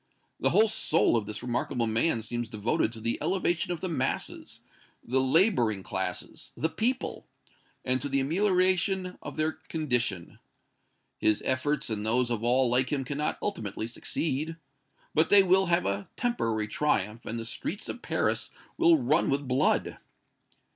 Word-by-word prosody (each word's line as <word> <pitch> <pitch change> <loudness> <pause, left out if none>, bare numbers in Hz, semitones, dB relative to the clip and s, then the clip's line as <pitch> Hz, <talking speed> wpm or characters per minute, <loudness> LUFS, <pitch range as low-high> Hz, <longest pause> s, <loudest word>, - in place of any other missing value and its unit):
The - - +2
whole 220 +1 +5
soul 170 - +2
of 110 -3 0
this 105 - -6
remarkable 125 0 -1
man 115 +2 +1
seems 120 +1 -3
devoted 110 0 0
to 115 - -8
the 115 +1 -2
elevation 175 +1 0
of 175 - -4
the 185 - -1
masses 135 -6 -3 0.4
the 130 +2 +1
laboring 130 - +2
classes - - -5
the 160 - 0
people 245 +8 -2 0.6
and 130 0 +1
to 145 - -2
the 135 0 +1
amelioration 185 +3 +1
of - - -7
their 155 +1 +1
condition. 125 - -2 0.8
His 110 -1 +2
efforts 130 0 0
and 105 -1 -2
those 120 +3 +1
of 115 -1 -2
all 125 +2 +3
like 125 +1 +1
him 135 -3 -1
cannot 145 +3 -2
ultimately 110 - -3
succeed. 150 +6 -3 0.6
But 160 +1 +3
they 200 -1 +7
will 190 +1 +3
have 170 0 +2
a 100 0 -2
temporary 115 - -1
triumph, 105 -3 -1
and 115 - -3
the 115 - -5
streets 195 - -4
of 245 - -6
Paris - - 0 0.3
will 340 -1 +6
run 250 -4 +2
with 140 0 0
blood! 125 +1 +1
135 Hz, 155 wpm, -28 LUFS, 115-175 Hz, 0.8 s, they